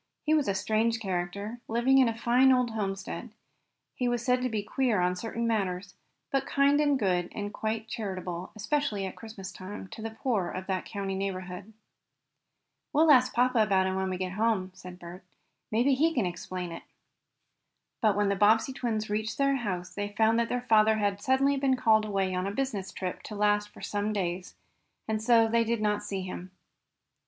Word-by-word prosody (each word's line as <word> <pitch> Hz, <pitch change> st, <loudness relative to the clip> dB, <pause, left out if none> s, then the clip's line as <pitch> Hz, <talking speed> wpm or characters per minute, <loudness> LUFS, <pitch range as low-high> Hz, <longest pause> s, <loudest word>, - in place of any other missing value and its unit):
He 310 Hz, -, +2 dB
was 300 Hz, -4 st, +2 dB
a 200 Hz, -, +1 dB
strange 225 Hz, +3 st, +1 dB
character, 200 Hz, +3 st, -3 dB
living 240 Hz, +4 st, +3 dB
in 255 Hz, -3 st, +5 dB
a 225 Hz, -, -4 dB
fine 250 Hz, +3 st, +4 dB
old 250 Hz, -2 st, +2 dB
homestead. 195 Hz, +2 st, -4 dB, 0.6 s
He 250 Hz, -, -1 dB
was 240 Hz, -1 st, -1 dB
said 250 Hz, 0 st, +2 dB
to 255 Hz, -, 0 dB
be 215 Hz, -3 st, -2 dB
queer 230 Hz, 0 st, +1 dB
on 180 Hz, 0 st, +1 dB
certain 230 Hz, +4 st, -3 dB
matters, 195 Hz, -4 st, -1 dB, 0.4 s
but 275 Hz, -1 st, 0 dB
kind 280 Hz, +1 st, +3 dB
and 290 Hz, -2 st, +3 dB
good, 180 Hz, -6 st, 0 dB
and 205 Hz, -1 st, -4 dB
quite 220 Hz, 0 st, -3 dB
charitable, 185 Hz, -5 st, -5 dB
especially 215 Hz, -3 st, -1 dB
at 190 Hz, -, -6 dB
Christmas 215 Hz, -4 st, -9 dB
time, 190 Hz, +2 st, -8 dB
to -, -, -9 dB
the 225 Hz, -, -3 dB
poor 220 Hz, -5 st, -1 dB
of 185 Hz, 0 st, -5 dB
that 190 Hz, -1 st, -3 dB
country 195 Hz, -2 st, -3 dB
neighborhood. 190 Hz, +1 st, -5 dB, 1.2 s
"We'll 310 Hz, +1 st, +5 dB
ask 255 Hz, -2 st, +6 dB
papa 250 Hz, -1 st, +3 dB
about 195 Hz, -3 st, +3 dB
him 190 Hz, 0 st, -1 dB
when 190 Hz, 0 st, -1 dB
we 185 Hz, -, -2 dB
get 185 Hz, 0 st, -3 dB
home," 205 Hz, -2 st, 0 dB
said 180 Hz, -1 st, -11 dB
Bert. 180 Hz, +1 st, -10 dB, 0.5 s
"Maybe 240 Hz, +6 st, +3 dB
he 320 Hz, +5 st, +2 dB
can 235 Hz, -7 st, +2 dB
explain 180 Hz, 0 st, -5 dB
it." 165 Hz, -, -7 dB, 1.2 s
But 215 Hz, -4 st, +3 dB
when 205 Hz, -1 st, +2 dB
the 200 Hz, -, +1 dB
Bobbsey 220 Hz, +6 st, +3 dB
twins 220 Hz, -4 st, -2 dB
reached 215 Hz, +2 st, -2 dB
their 275 Hz, 0 st, +2 dB
house 185 Hz, -7 st, -4 dB
they 205 Hz, 0 st, -3 dB
found 225 Hz, +1 st, +4 dB
that 235 Hz, -, 0 dB
their 245 Hz, -, -1 dB
father 220 Hz, -2 st, +4 dB
had 205 Hz, -1 st, 0 dB
suddenly 270 Hz, +3 st, +2 dB
been 270 Hz, -1 st, +2 dB
called 220 Hz, -3 st, +3 dB
away 195 Hz, -3 st, -1 dB
on 185 Hz, +1 st, -1 dB
a -, -, -2 dB
business 210 Hz, -5 st, -3 dB
trip 185 Hz, -1 st, -5 dB
to 210 Hz, -, -8 dB
last 210 Hz, 0 st, +2 dB
for -, -, -14 dB
some 205 Hz, +1 st, -1 dB
days, 180 Hz, -2 st, -3 dB, 0.5 s
and 220 Hz, -1 st, -1 dB
so 230 Hz, 0 st, +5 dB
they 230 Hz, +1 st, +3 dB
did 230 Hz, 0 st, -1 dB
not 210 Hz, -1 st, +1 dB
see 195 Hz, -2 st, -4 dB
him. 185 Hz, 0 st, -7 dB
215 Hz, 195 wpm, -29 LUFS, 190-240 Hz, 1.2 s, ask